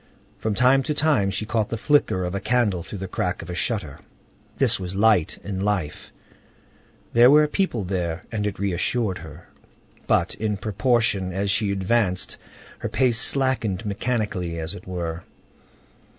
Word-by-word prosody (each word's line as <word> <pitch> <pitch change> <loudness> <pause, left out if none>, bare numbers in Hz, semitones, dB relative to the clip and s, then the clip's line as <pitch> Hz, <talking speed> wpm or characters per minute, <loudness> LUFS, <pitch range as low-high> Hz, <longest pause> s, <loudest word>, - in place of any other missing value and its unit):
From 110 -1 -1
time 130 +3 +4
to 150 - +1
time 145 -11 +2
she 100 +2 -3
caught 110 -1 -1
the 115 - -3
flicker 115 -7 +2
of 90 0 -3
a 100 - -1
candle 105 -5 +1
through 100 - -8
the 95 0 -5
crack 90 -1 -2
of 85 - -7
a - - -4
shutter—this 85 - -2
was 90 0 -5
light 105 -5 +3
and 95 -1 -4
life; 90 -7 -2 1.0
there 120 +2 +7
were 150 +2 +6
people 150 - -1
there, 90 -2 -3
and 105 -2 -1
it 100 - -4
reassured 100 +2 -1
her. 80 0 -12 0.6
But - - +2
in 105 -2 -2
proportion 105 -2 +1
as 100 +2 0
she 105 -1 +1
advanced, 95 -1 0 0.4
her 115 - -3
pace 120 +1 +3
slackened 115 -8 +1
mechanically, 100 -5 -2
as 80 +2 -4
it 90 -2 -11
were. 85 -2 -4
100 Hz, 155 wpm, -23 LUFS, 90-115 Hz, 1.0 s, there